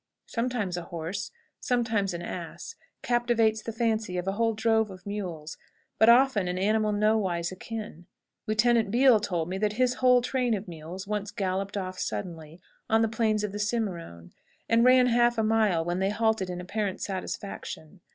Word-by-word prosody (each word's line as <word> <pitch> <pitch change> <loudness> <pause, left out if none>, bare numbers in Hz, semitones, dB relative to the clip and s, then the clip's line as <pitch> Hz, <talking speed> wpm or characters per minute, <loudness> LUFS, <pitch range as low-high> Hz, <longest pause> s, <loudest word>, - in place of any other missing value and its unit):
Sometimes 230 -7 -2
a 175 - -5
horse, 170 +4 -5 0.3
sometimes 225 -6 0
an 170 - -5
ass, 175 - -7 0.3
captivates 235 -3 +2
the 225 - -5
fancy 220 -4 -1
of 180 +1 -3
a - - +2
whole 225 +2 0
drove 220 0 +2
of 185 -1 -12
mules, 180 -7 -5 0.4
but 220 +2 +6
often 235 -5 +5
an 180 0 -2
animal 215 +2 +1
nowise 205 -5 +1
akin. 200 -3 -7 0.4
Lieutenant 220 0 +3
Beale 245 +1 +5
told 175 -6 -2
me 190 +2 -3
that 210 0 0
his 250 +2 +2
whole 250 -1 +5
train 250 -2 0
of 200 +1 -6
mules 170 +3 -8
once 210 0 -3
galloped 195 -1 -2
off 185 -1 -4
suddenly, 165 -2 -5 0.3
on 225 0 +4
the - - +3
plains 220 -1 0
of 210 - -2
the 205 - -5
Cimarone, 185 - -3 0.4
and 230 0 +4
ran 255 0 +6
half 240 -1 +3
a 220 - +2
mile, 215 -7 +2
when 175 +1 -1
they 190 +1 +1
halted 220 -3 0
in 180 0 -4
apparent 195 +2 -3
satisfaction. 190 -2 -6
210 Hz, 170 wpm, -27 LUFS, 185-225 Hz, 0.4 s, but